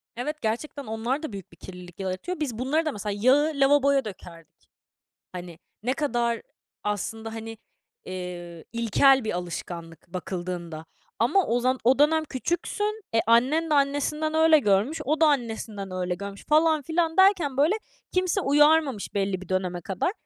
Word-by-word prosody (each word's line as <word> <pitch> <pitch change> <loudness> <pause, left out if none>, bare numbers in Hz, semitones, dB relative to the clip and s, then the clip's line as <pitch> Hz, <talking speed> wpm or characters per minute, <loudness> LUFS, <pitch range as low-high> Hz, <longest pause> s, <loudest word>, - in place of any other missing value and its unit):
Evet, 300 +6 -4
gerçekten 265 +6 -3
onlar 235 +7 -2
da 310 - -5
büyük 195 -3 -8
bir 170 - -18
kirlilik 180 0 -11
yaratıyor. 190 - -4
Biz 265 -8 -3
bunları 285 +7 0
da, 310 - 0
mesela, 210 -3 -4
yağı 285 +6 +4
lavaboya 280 -1 +3
dökerdik. 170 -5 -12 0.6
Hani, 175 -2 -8 0.2
ne 250 +3 +1
kadar 240 -6 -1 0.4
aslında, 220 +2 -3
hani, 225 0 -7 0.5
eee, 175 -2 -7
ilkel 235 +4 +4
bir 220 - -2
alışkanlık 170 -2 -7
bakıldığında. 175 -2 -5 0.3
Ama 310 - +3
o 240 +2 +1
zan 255 +1 +1
o 255 +4 +4
dönem 315 +2 +4
küçüksün, 350 - -2
e, 225 - +4
annen 265 +8 +3
de - - +2
annesinden 290 +2 +1
öyle 320 0 +6
görmüş, 210 +6 +1
o 310 +4 0
da 320 - +7
annesinden 225 -7 -2
öyle 180 -1 -2
görmüş 200 +1 -8
falan 310 0 +4
filan 325 +3 -1
derken, 375 -8 +4
böyle, 300 +7 +4 0.4
kimse 370 +1 +1
uyarmamış 295 - +3
belli 195 -2 -1
bir 190 - -12
döneme 185 -2 -1
kadar. 190 - -1
240 Hz, 155 wpm, -26 LUFS, 190-300 Hz, 0.6 s, da